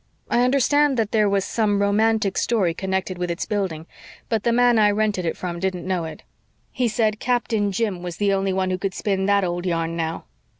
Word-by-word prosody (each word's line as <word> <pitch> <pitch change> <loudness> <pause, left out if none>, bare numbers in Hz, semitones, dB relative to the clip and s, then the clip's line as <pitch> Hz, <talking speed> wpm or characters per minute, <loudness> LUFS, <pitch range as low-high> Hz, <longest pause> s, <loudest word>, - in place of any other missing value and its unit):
I 240 - +3
understand 275 +2 +3
that 220 -2 0
there 210 -2 +3
was 195 -1 +1
some 210 -3 0
romantic 210 0 +2
story 200 -8 +1
connected 190 0 -3
with 180 0 -2
its 170 - -3
building, 185 -7 -2 0.4
but 225 -2 0
the 235 - +1
man 245 -1 +4
I 210 -1 +5
rented 205 -3 0
it - - -2
from 175 -2 -4
didn't 180 -2 -2
know 185 -3 -1
it." 160 - -9 0.5
"He 250 -2 0
said 215 -1 0
Captain 230 -4 0
Jim 195 -3 -2
was 175 0 -6
the 200 -1 +1
only 195 0 0
one 185 0 0
who 185 - -2
could 195 0 -3
spin 195 -2 -1
that 200 -1 +3
old 175 0 -2
yarn 165 -1 -1
now." 165 -1 -3
200 Hz, 210 wpm, -22 LUFS, 180-220 Hz, 0.5 s, I